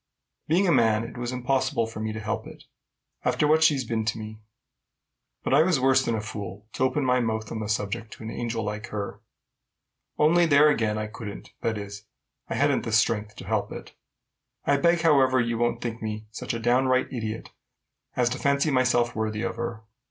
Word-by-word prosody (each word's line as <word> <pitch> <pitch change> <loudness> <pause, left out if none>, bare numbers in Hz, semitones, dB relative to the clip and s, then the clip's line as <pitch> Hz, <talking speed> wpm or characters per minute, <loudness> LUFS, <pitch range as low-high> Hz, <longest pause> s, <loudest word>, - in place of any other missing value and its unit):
Being 180 +5 +3
a - - +4
man, 110 -5 +3
it 115 - -8
was 120 0 -3
impossible 125 -2 0
for 110 -1 -8
me 110 0 -2
to 110 - -5
help 110 0 -3
it, - - -12 0.6
after 150 - +2
what 160 +1 +4
she's 145 -5 +3
been 110 -1 -1
to 110 0 -1
me. 110 0 -8 1.0
But - - 0
I 145 - +7
was 170 -3 +3
worse 130 0 +4
than 115 - 0
a 110 - -2
fool 105 -2 -7
to - - -1
open 130 +2 +1
my 125 0 +3
mouth 110 -2 -2
on 115 - -3
the 105 -1 -4
subject 105 +1 -2
to - - -11
an 110 - -5
angel 115 -1 -3
like 105 +2 -4
her. 100 -1 -5 1.0
Only 170 +3 +4
there 145 0 +6
again, 110 -7 +1
I 110 - -2
couldn't, 105 -1 -8
that 110 -1 -1
is, 100 0 -7 0.4
I - - -2
hadn't - - +2
the - - -4
strength 105 -1 +1
to - - -9
help - - -1
it. - - -9 0.7
I 140 - +3
beg, 170 +3 +3
however, 135 -5 +4
you 115 -1 0
won't 120 0 0
think 115 -1 -4
me 110 0 -4
such 110 - -4
a - - -3
downright 130 +3 +2
idiot 110 -2 -4 0.6
as 125 -1 +2
to 130 +2 -4
fancy 140 +2 +2
myself 125 -2 +2
worthy 110 0 -2
of - - -3
her. 115 -1 -4
115 Hz, 205 wpm, -26 LUFS, 110-130 Hz, 1.0 s, I